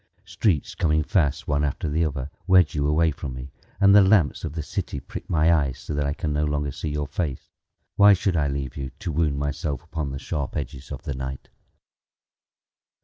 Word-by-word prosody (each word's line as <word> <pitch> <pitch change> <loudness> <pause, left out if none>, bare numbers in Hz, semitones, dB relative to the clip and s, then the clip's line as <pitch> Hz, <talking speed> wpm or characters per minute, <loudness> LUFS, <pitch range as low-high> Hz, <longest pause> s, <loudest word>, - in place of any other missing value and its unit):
Streets 90 -10 0
coming 75 -1 +1
fast, 75 -2 0
One 75 0 +1
after 75 +2 -2
the 80 +3 +1
other, 70 -3 -3 0.2
Wedge 90 -4 +5
you 75 -1 0
away 80 +2 +3
from 70 -2 -6
me, 65 +1 -8 0.3
And 100 0 +6
the 105 - +9
lamps 95 -6 +3
of 80 -3 -4
the 80 -1 -3
city 70 - -4
prick - - -9
my 80 0 +4
eyes 70 -6 +1
So - - -6
that 75 -1 0
I 70 - 0
can 75 -3 -2
no 75 +1 +1
longer 75 -1 -1
see 75 - -4
your 75 0 -2
face. 70 -2 -4 0.5
Why 100 0 +8
should 95 -1 0
I 75 -3 +2
leave 70 -3 -3
you, 70 -2 -4
To 85 - -4
wound 75 -2 +1
myself 70 -1 -3
upon 80 -3 -4
the 70 - -5
sharp 70 -1 -4
edges 65 +3 -6
of 65 - -6
the 70 - -3
night? 65 0 -6
75 Hz, 205 wpm, -24 LUFS, 70-80 Hz, 0.5 s, the